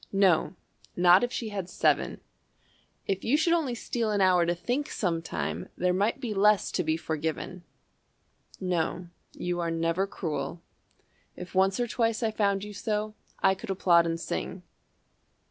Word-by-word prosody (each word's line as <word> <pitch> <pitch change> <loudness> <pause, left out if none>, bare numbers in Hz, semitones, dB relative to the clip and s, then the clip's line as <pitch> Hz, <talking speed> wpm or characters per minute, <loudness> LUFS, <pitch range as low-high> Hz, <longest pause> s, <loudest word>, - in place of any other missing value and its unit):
No, 195 -3 +3 0.4
not 180 +3 +6
if 245 - 0
she 230 -3 -3
had 195 -3 -4
seven. - - +1 0.8
If 195 -1 -2
you 265 +6 +3
should 335 +2 +3
only 300 -8 0
steal 230 -1 -2
an 205 -1 +1
hour 180 -3 +4
to 175 - +1
think, 250 - -2
Sometime, 165 -4 -2
there 180 0 +2
might 205 +7 +1
be 240 -5 -3
less 210 +1 +3
to 180 - 0
be 160 0 0
forgiven. 160 +3 -4 1.0
"No, 180 -1 -1 0.2
you 175 0 -3
are 170 -1 -1
never 165 +3 0
cruel. 170 -2 -4 0.7
If 180 0 -9
once 190 +3 +3
or 245 - +2
twice 230 0 0
I 220 - +1
found 200 -2 +1
you 210 0 -7
so, 210 0 -2 0.3
I 190 - +6
could 195 +3 -9
applaud 175 -3 +4
and 165 0 -2
sing. 180 +2 -4
190 Hz, 160 wpm, -28 LUFS, 175-215 Hz, 1.0 s, not